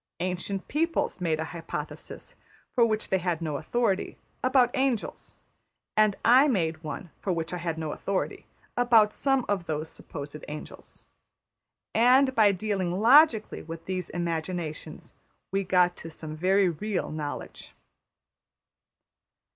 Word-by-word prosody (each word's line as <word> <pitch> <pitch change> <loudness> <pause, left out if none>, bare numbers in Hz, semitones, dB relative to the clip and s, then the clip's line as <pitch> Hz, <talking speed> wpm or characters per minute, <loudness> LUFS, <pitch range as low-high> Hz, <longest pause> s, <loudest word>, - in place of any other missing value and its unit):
Ancient 185 +2 -3
peoples 330 - -1
made 160 -3 0
a 160 - -1
hypothesis, 165 +1 -7 0.4
for 240 - +4
which 215 -1 -2
they 190 - +2
had 175 -2 -1
no 155 -4 -2
authority, 200 - -1 0.3
about 255 -1 +4
angels; 260 -5 -2 0.6
and 215 -2 +4
I 255 +5 +7
made 165 - 0
one, 160 +2 -6
for 195 - -2
which 165 0 -2
I - - -2
had 170 -2 -3
no 160 -2 -3
authority, 195 +4 -3 0.3
about 230 -3 +4
some 270 -2 +1
of 190 -4 -1
those 155 0 -3
supposed 145 0 -9
angels. 150 +1 -10 0.9
And, 260 +4 +5
by 215 -4 +5
dealing 190 -2 -2
logically 240 -1 +5
with 165 0 -9
these 185 -2 -3
imaginations, 165 -2 -4 0.4
we 195 +1 0
got 180 -1 +3
to 165 - -8
some 155 -1 -8
very 190 +4 +3
real 185 +3 -2
knowledge. 150 -2 -6
185 Hz, 130 wpm, -27 LUFS, 165-220 Hz, 0.9 s, I